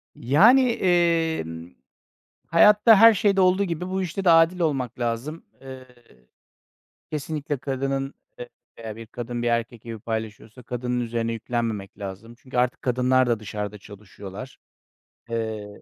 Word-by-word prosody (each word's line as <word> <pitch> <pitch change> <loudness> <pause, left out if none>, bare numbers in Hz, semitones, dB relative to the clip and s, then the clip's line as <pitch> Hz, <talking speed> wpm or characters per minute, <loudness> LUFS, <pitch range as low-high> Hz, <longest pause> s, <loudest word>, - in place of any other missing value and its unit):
Yani, 205 - +5
emm, 165 - 0 0.8
hayatta 210 +6 +6
her 225 +2 +8
şeyde 200 -1 +2
olduğu 185 +2 +3
gibi 175 0 -4
bu 190 0 -1
işte 185 +2 -4
de 180 - +5
adil 165 +2 +4
olmak 135 -7 -1
lazım. 120 +7 -3 0.2
Eee, 130 -1 -10 1.2
kesinlikle 150 -1 -4
kadının, 135 +1 -3 0.2
e - - -8 0.3
veya 110 -2 -7
1 115 0 -10
kadın 120 +1 -6
1 120 - 0
erkek 115 -1 -2
evi 115 -1 -6
paylaşıyorsa 110 +1 -6
kadının 125 +1 -3
üzerine 115 -1 -2
yüklenmemek 115 -3 -4
lazım. 100 +3 -8
Çünkü 130 -1 -10
artık 125 0 0
kadınlar 130 +1 +2
da 120 -2 0
dışarıda 105 -1 -6
çalışıyorlar. 100 +3 -11 0.7
Eee 110 -3 -5
125 Hz, 135 wpm, -24 LUFS, 115-165 Hz, 1.2 s, her